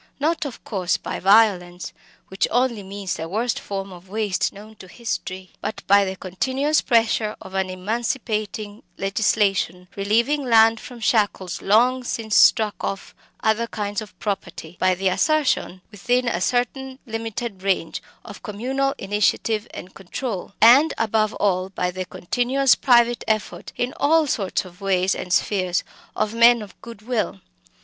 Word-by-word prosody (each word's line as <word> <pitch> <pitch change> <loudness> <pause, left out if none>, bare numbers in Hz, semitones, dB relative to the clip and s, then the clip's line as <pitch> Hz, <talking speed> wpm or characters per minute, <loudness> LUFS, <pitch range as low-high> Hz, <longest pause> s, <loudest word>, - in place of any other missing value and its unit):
Not, 320 +2 0
of 275 - -7
course, 185 -5 -1
by - - -5
violence 190 -4 +3 0.4
which 190 +2 0
only 245 -2 +1
means 195 0 -5
the 160 0 -5
worst 225 +5 -1
form 195 -1 -5
of 180 +1 -14
waste 210 -2 -1
known 210 +2 -13
to 185 - -12
history 185 -3 -5
but 215 - -5
by 200 0 +5
the 190 0 -4
continuous 260 +12 0
pressure 225 -2 +1
of 190 - -12
an 190 -1 -1
emancipating 215 +1 -3 0.2
legislation, 195 -2 0
relieving 235 +9 +1
land 225 -2 +5
from 245 -2 -11
shackles 205 -5 0
long 245 +5 +3
since 225 -3 -2
struck 215 -3 +5
off 195 - -4 0.3
other 220 +2 +1
kinds 205 -1 -3
of 215 - -12
property 195 -5 -5
by 185 0 +3
the 190 +2 -1
assertion, 255 - +1
within 245 +5 0
a 180 -7 -1
certain 260 +4 -1
limited 225 -2 -5
range, 190 -4 -1 0.2
of 205 -3 -10
communal 265 +6 -2
initiative 210 +2 0
and 180 - -10
control 195 0 -6
and 270 +8 +6
above 215 -1 +1
all 185 -2 0
by 180 -1 -2
the 185 +1 -5
continuous 250 +9 +1
private 240 -2 +3
effort 215 -1 -2
in 245 +1 -1
all 315 +3 +3
sorts 200 -9 -1
of 180 +2 -15
ways 190 -1 +1
and 180 - -6
spheres 185 -1 +1 0.3
of 215 0 -1
"men 235 0 +5
of 200 - -15
good 230 -3 -11
will." 225 -4 -2
215 Hz, 150 wpm, -22 LUFS, 190-240 Hz, 0.4 s, and